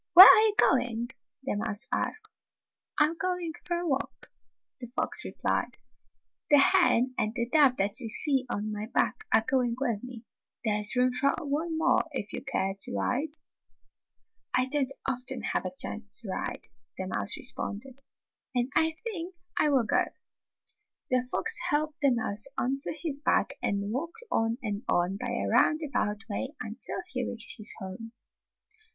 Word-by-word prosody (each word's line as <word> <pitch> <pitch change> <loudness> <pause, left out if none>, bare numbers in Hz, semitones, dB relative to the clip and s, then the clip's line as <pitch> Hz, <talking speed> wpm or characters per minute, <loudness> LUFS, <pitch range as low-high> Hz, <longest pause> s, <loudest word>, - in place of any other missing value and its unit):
"Where 370 +2 +14
are - - +9
you 435 -2 +3
going?" 240 - +2 0.3
the 265 - -2
mouse 215 +2 +1
asked. 435 0 -2 0.7
"I - - +7
'm 325 +2 -3
going 360 -3 -2
for 345 -1 -2
a 345 0 -3
walk," 275 -1 -3 0.5
the 245 - -6
fox - - 0
replied. - - -2 0.7
"The 290 - +7
hen 275 -6 +4
and 215 +2 -1
the 235 -1 -1
dove 275 -1 +5
that 200 +5 +3
you 230 -4 -4
see 270 +1 +1
on 215 -1 -2
my 210 0 -4
back 435 - 0
are 220 0 +4
going 250 -4 +1
with 235 -7 0
me. 245 -2 -9 0.4
There 210 -1 +1
's 210 - +5
room 250 0 +3
for 275 +3 +1
one 315 +3 -2
more 320 - +3
if 210 -6 -4
you - - -5
care 195 -8 -1
to 245 - 0
ride." 290 +5 -1 1.2
"I 255 - +3
don't 270 0 0 0.2
often 250 -1 -1
have - - -1
a 185 - -8
chance 215 -2 0
to 220 - -8
ride," 185 - -4 0.3
the - - -3
mouse - - 0
responded, 250 +6 -4 0.6
"and 245 +1 0
I 320 0 +3
think 375 -6 -5 0.2
I 305 - +4
will 265 -5 +3 1.3
The 255 0 +2
fox 450 +8 +1
helped 305 0 0
the 280 -2 +5
mouse 220 -1 0
onto 270 +3 0
his 310 -2 -3
back 300 - +1
and 200 +1 -1
walked 335 - -5
on 225 +1 +1
and 205 -2 -3
on 175 +3 +1
by - - -4
a 100 - -1
roundabout 225 - +1
way 260 +7 -4
until 220 +4 -5
he 255 -9 -3
reached 230 -1 -2
his 215 - -3
home. 190 +5 -8
255 Hz, 165 wpm, -28 LUFS, 220-300 Hz, 1.3 s, Where